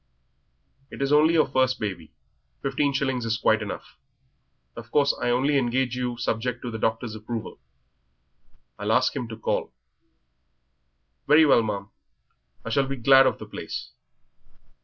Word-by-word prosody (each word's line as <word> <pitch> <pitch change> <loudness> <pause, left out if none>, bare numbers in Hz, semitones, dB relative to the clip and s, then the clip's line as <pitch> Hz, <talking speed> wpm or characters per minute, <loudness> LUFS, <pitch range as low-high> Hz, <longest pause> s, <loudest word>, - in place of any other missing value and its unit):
"It - - -10
is 140 +1 +1
only 155 +3 +5
your 155 - +4
first 130 -1 +1
baby. 95 -7 -5 0.5
Fifteen 140 +1 0
shillings 135 -3 -1
is 115 0 -1
quite 110 -1 +2
enough. 105 - -7 0.8
Of 115 0 -10
course 140 +1 +2
I 120 - 0
only 135 +4 +2
engage 125 0 0
you 125 -1 -3
subject 120 +2 -2
to 120 - -4
the 110 - -5
doctor's 115 +1 -1
approval. 110 +1 -6 1.2
I'll 105 +2 0
ask 125 +4 +2
him 125 -4 -3
to 110 -1 -8
call." 110 - -2 1.6
"Very 155 +2 +6
well, 135 -5 +5
ma'am; 100 -3 -4 0.7
I 115 - -4
shall 135 +3 +2
be 135 - -3
glad 135 +1 +6
of - - 0
the - - -9
place." - - -7
125 Hz, 150 wpm, -25 LUFS, 115-135 Hz, 1.6 s, Very